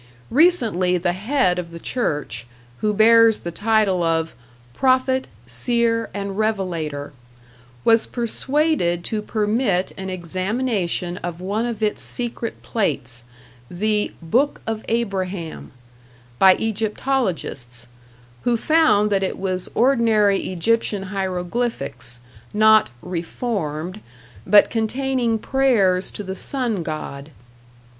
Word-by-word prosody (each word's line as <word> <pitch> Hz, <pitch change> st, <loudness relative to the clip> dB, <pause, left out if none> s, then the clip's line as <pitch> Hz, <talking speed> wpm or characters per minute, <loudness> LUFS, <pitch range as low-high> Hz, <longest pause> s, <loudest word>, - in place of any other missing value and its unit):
Recently 230 Hz, -, +3 dB
the 175 Hz, 0 st, 0 dB
head 205 Hz, -2 st, +1 dB
of 170 Hz, -1 st, -5 dB
the 170 Hz, -, -9 dB
church, 145 Hz, -, -3 dB, 0.3 s
who 210 Hz, -, 0 dB
bears 225 Hz, +1 st, +5 dB
the 170 Hz, -, -5 dB
title 210 Hz, -1 st, +2 dB
of 165 Hz, -1 st, 0 dB, 0.4 s
"Prophet, 260 Hz, -, +2 dB, 0.2 s
Seer 230 Hz, -, +1 dB
and 200 Hz, 0 st, -4 dB
Revelator", 170 Hz, -10 st, -2 dB, 0.7 s
was 225 Hz, 0 st, +4 dB
persuaded 240 Hz, -, 0 dB
to 215 Hz, +3 st, -1 dB
permit 210 Hz, -3 st, 0 dB
an 190 Hz, 0 st, -5 dB
examination 185 Hz, 0 st, -2 dB
of 175 Hz, -1 st, -5 dB
one 205 Hz, +6 st, -1 dB
of 225 Hz, -2 st, -4 dB
its 210 Hz, -, 0 dB
secret 235 Hz, -1 st, -3 dB
plates, 125 Hz, -, -2 dB, 0.4 s
the 210 Hz, +3 st, 0 dB
"Book 250 Hz, -, +1 dB
of 225 Hz, -1 st, -3 dB
Abraham", 190 Hz, -, -3 dB, 0.7 s
by 190 Hz, -1 st, +7 dB
egyptologists, 210 Hz, -, -2 dB, 0.6 s
who 240 Hz, -1 st, +1 dB
found 225 Hz, -8 st, +3 dB
that 195 Hz, -1 st, +2 dB
it 190 Hz, -, -2 dB
was 185 Hz, -1 st, -2 dB
ordinary 225 Hz, -5 st, +3 dB
Egyptian 205 Hz, +2 st, 0 dB
hieroglyphics, 180 Hz, -, -3 dB, 0.4 s
not 215 Hz, -3 st, +5 dB
"reformed", 180 Hz, -1 st, -4 dB, 0.5 s
but 210 Hz, -, +6 dB
containing 240 Hz, +1 st, 0 dB
prayers 215 Hz, -8 st, +2 dB
to 205 Hz, -, -6 dB
the 190 Hz, -1 st, -5 dB
sun 240 Hz, -5 st, -2 dB
god. 155 Hz, -3 st, -6 dB
205 Hz, 105 wpm, -21 LUFS, 175-230 Hz, 0.7 s, by